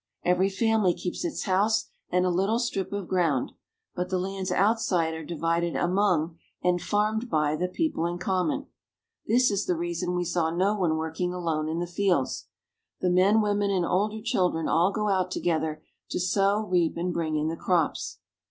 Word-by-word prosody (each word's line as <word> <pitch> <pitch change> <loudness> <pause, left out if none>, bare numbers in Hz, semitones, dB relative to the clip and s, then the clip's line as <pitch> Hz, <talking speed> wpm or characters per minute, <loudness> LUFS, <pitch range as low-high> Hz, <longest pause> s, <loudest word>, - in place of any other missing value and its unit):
Every 180 +2 +3
family 215 -2 +2
keeps 180 - -4
its 340 -3 -3
house 210 +3 +1 0.2
and 180 +1 +2
a 180 - +2
little 195 +6 +1
strip 235 -6 -2
of 200 -3 -4
ground, 165 -8 +1 0.4
but 180 0 -3
the 185 - 0
lands 190 0 -3
outside 190 -5 +2
are 160 0 -6
divided 170 +1 -1
among, 175 -3 +1 0.2
and 180 -1 +2
farmed 215 +5 0
by, 150 -3 +1
the 180 +4 -1
people 180 - -1
in 175 0 -3
common. 195 - -1 0.6
This 245 +1 +4
is 200 0 -1
the 180 - +2
reason 175 +1 -2
we 175 0 0
saw 165 -1 0
no 185 +5 +1
one 170 -6 +1
working 160 +3 -2
alone 160 -3 -1
in 160 - -2
the 175 - -1
fields. 175 -5 0 0.5
The 180 - +1
men, 195 +5 +4
women, 205 -1 +1
and 185 -3 +1
older 210 +4 0
children 180 -7 +1
all 175 +4 +3
go 210 +1 -1
out 185 -2 +1
together 160 -3 -1 0.3
to - - -2
sow, 200 +3 +2
reap, 180 -4 +1
and 175 +1 -1
bring 160 -2 -1
in 155 0 0
the 165 - -2
crops. 170 -2 0
180 Hz, 180 wpm, -27 LUFS, 170-200 Hz, 0.6 s, This